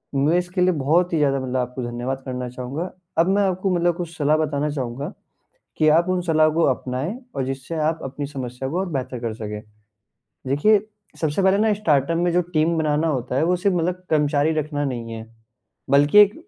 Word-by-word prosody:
मैं 150 Hz, +5 st, +3 dB
इसके 180 Hz, +1 st, -1 dB
लिए 185 Hz, -, +4 dB
बहुत 175 Hz, +5 st, +2 dB
ही 165 Hz, -, +2 dB
ज़्यादा 140 Hz, -2 st, +2 dB
मतलब 130 Hz, 0 st, -2 dB
आपको 125 Hz, +1 st, -3 dB
धन्यवाद 120 Hz, +3 st, -3 dB
करना 125 Hz, -1 st, -4 dB
चाहूँगा, 130 Hz, +8 st, -5 dB, 0.3 s
अब 165 Hz, -, +4 dB
मैं -, -, +3 dB
आपको 185 Hz, 0 st, 0 dB
मतलब 175 Hz, 0 st, +2 dB
कुछ 170 Hz, -2 st, -5 dB
सलाह 150 Hz, +1 st, +3 dB
बताना 150 Hz, -1 st, 0 dB
चाहूँगा, 135 Hz, 0 st, -4 dB, 0.6 s
कि 155 Hz, -, +3 dB
आप 170 Hz, +2 st, +2 dB
उन 185 Hz, 0 st, +1 dB
सलाह 155 Hz, -2 st, +3 dB
को 165 Hz, +2 st, +1 dB
अपनाएँ 130 Hz, +6 st, -4 dB, 0.2 s
और 135 Hz, -, -1 dB
जिससे 135 Hz, +4 st, -5 dB
आप 160 Hz, +1 st, 0 dB
अपनी 140 Hz, +2 st, -4 dB
समस्या 130 Hz, -2 st, -5 dB
को 175 Hz, -, -2 dB
और 190 Hz, -, -1 dB
बेहतर 130 Hz, -2 st, -3 dB
कर 115 Hz, -2 st, -3 dB
सकें। 105 Hz, -1 st, -6 dB, 0.9 s
देखिए, 200 Hz, +10 st, +4 dB, 0.4 s
सबसे 155 Hz, +4 st, 0 dB
पहले 190 Hz, +1 st, +4 dB
ना 215 Hz, 0 st, +3 dB
स्टार्टअप 165 Hz, -5 st, +1 dB
में 175 Hz, 0 st, +1 dB
जो 180 Hz, -, +4 dB
टीम 160 Hz, +2 st, +2 dB
बनाना 155 Hz, 0 st, +1 dB
होता 130 Hz, -4 st, -2 dB
है, 145 Hz, -, +2 dB
वो 180 Hz, +2 st, +2 dB
सिर्फ 185 Hz, +1 st, +1 dB
मतलब 180 Hz, +2 st, -1 dB
कर्मचारी 150 Hz, 0 st, +2 dB
रखना 150 Hz, -1 st, -2 dB
नहीं 120 Hz, -3 st, -4 dB
है, 110 Hz, 0 st, -7 dB, 0.6 s
बल्कि 145 Hz, +7 st, +6 dB
एक 205 Hz, 0 st, +7 dB
150 Hz, 200 wpm, -22 LUFS, 130-175 Hz, 0.9 s, एक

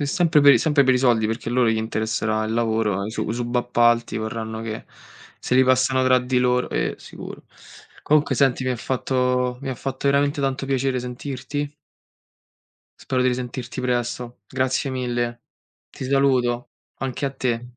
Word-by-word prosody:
È 145 Hz, -, 0 dB
sempre 165 Hz, +1 st, +3 dB
per 145 Hz, 0 st, +8 dB
i -, -, +4 dB
sempre 150 Hz, -3 st, +3 dB
per 130 Hz, 0 st, +4 dB
i -, -, +2 dB
soldi, 120 Hz, -4 st, +3 dB
perché 115 Hz, +1 st, -3 dB
a -, -, -2 dB
loro 125 Hz, -2 st, +3 dB
gli 110 Hz, -, +2 dB
interesserà 110 Hz, 0 st, -1 dB
il 110 Hz, -, -3 dB
lavoro, 110 Hz, -4 st, 0 dB
i 110 Hz, -, -4 dB
su -, -, -3 dB
i -, -, -1 dB
subappalti 120 Hz, -1 st, +1 dB
vorranno 110 Hz, 0 st, -4 dB
che 110 Hz, -1 st, -5 dB, 0.5 s
se 125 Hz, -, -2 dB
li 130 Hz, -, +6 dB
passano 130 Hz, 0 st, +3 dB
tra 130 Hz, 0 st, +5 dB
di 125 Hz, 0 st, 0 dB
loro. 125 Hz, 0 st, +2 dB
Eh, -, -, -1 dB
sicuro. -, -, -10 dB, 0.6 s
Comunque 150 Hz, 0 st, +2 dB
senti 135 Hz, -2 st, +2 dB
mi 130 Hz, -, 0 dB
ha 125 Hz, -, -1 dB
fatto 125 Hz, 0 st, 0 dB
mi 135 Hz, -, -6 dB
ha -, -, -3 dB
fatto 135 Hz, +2 st, -3 dB
veramente 140 Hz, +1 st, +2 dB
tanto 135 Hz, 0 st, -1 dB
piacere 135 Hz, -1 st, 0 dB
sentirti. 130 Hz, +3 st, -5 dB, 1.3 s
Spero 130 Hz, -1 st, 0 dB
di 130 Hz, -, +3 dB
risentirti 125 Hz, 0 st, -4 dB
presto, 120 Hz, -1 st, -2 dB
grazie 130 Hz, +1 st, -1 dB
mille. 120 Hz, -2 st, -2 dB, 0.5 s
Ti -, -, -8 dB
saluto. 130 Hz, -3 st, +1 dB, 0.3 s
Anche 135 Hz, +1 st, -3 dB
a 135 Hz, -, 0 dB
te. 120 Hz, -2 st, -3 dB
125 Hz, 175 wpm, -23 LUFS, 120-130 Hz, 1.3 s, per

